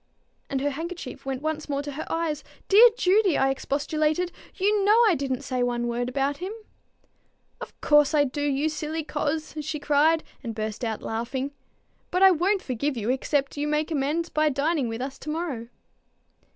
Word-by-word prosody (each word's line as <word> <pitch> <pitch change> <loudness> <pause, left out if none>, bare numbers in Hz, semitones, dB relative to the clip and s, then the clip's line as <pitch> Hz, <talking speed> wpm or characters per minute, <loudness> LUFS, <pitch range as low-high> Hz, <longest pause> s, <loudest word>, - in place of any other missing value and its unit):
And 270 -1 -1
her 290 +1 0
handkerchief 320 -3 -6
went 265 +1 -3
once 310 -1 -3
more 280 0 -1
to 290 - -5
her 290 +3 -6
eyes. 320 -3 -1 0.2
"Dear 445 +5 +8
Judy!" 380 -3 +3
I 270 0 +3
expostulated, 305 +5 -1 0.2
"you 405 +1 +2
know 420 +3 +5
I 420 - +5
didn't 265 -4 -2
say 255 -1 -2
one 240 -1 0
word 240 +1 -1
about 275 +2 0
him." 370 +5 -5 1.1
"Of - - -9
course 295 0 +4
I 290 - +5
do, 285 +1 -3
you 290 +1 +1
silly 310 +1 -3
coz!" 310 +1 -2
she 305 +1 -4
cried, 300 +3 +3 0.2
and 230 -3 -5
burst 215 +1 -4
out 220 -2 -3
laughing. 250 +5 -3 0.6
"But 365 +2 +2
I 385 - +9
won't 370 +4 +1
forgive 265 +2 -2
you 225 +2 0
except 275 +2 -1
you 290 +1 -1
make 300 +2 0
amends 310 +3 0
by 310 0 +2
dining 285 -1 0
with 225 +2 -4
us 270 0 -6
to 305 - -7
morrow." 300 -8 -3
290 Hz, 180 wpm, -26 LUFS, 265-320 Hz, 1.1 s, I